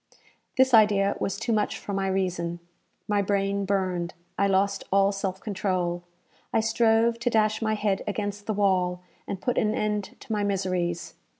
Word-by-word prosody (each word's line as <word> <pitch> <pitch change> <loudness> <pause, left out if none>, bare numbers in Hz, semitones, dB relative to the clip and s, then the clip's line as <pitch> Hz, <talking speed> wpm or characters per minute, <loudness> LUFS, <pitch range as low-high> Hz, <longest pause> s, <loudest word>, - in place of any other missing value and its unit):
This 260 0 +4
idea 210 -3 +5
was 195 - -2
too 230 +2 -1
much 210 -1 0
for 200 - -6
my 195 0 0
reason. 180 -3 -1 0.5
My 205 -1 +2
brain 200 0 0
burned 185 -3 -1 0.2
I 200 - +2
lost 195 +1 +1
all 195 0 +4
self 195 -1 -3
control 185 -4 -1 0.5
I - - +2
strove 225 +1 +3
to 240 +1 0
dash 215 -1 +2
my 215 -1 +1
head 205 -2 0
against 205 0 -3
the 215 - 0
wall, 180 -3 +1 0.2
and 195 - -4
put 245 +5 0
an 215 0 +1
end 210 -2 -2
to - - -10
my 210 -1 0
miseries. 185 -4 -1
200 Hz, 170 wpm, -26 LUFS, 190-215 Hz, 0.5 s, idea